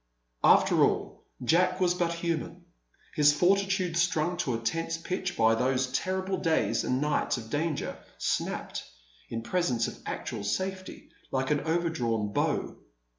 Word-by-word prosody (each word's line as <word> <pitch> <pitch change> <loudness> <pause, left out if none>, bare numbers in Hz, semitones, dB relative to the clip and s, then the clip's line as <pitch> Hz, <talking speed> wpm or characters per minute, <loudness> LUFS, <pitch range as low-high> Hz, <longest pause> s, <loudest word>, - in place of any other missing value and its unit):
After - - +5
all, - - -1 0.2
Jack 180 +7 +3
was 180 -1 +3
but 175 -1 0
human. 170 +1 -3 0.5
His 150 -2 +5
fortitude, 190 +1 +2
strung 175 0 +1
to 130 -9 -1
a - - 0
tense 165 +8 -2
pitch 185 +2 -3
by 115 0 +5
those 125 +2 +1
terrible 190 +6 -1
days 165 -2 +1
and 125 - 0
nights 150 -2 +1
of 110 -2 -9
danger, 150 0 -2 0.2
snapped, - - -2 0.5
in 115 0 -4
presence 125 -7 0
of - - -8
actual 115 -6 -4
safety, 185 - -4 0.2
like 130 +1 -1
an 150 - +3
overdrawn 125 -11 -1
bow. - - -1
165 Hz, 140 wpm, -29 LUFS, 130-180 Hz, 0.5 s, After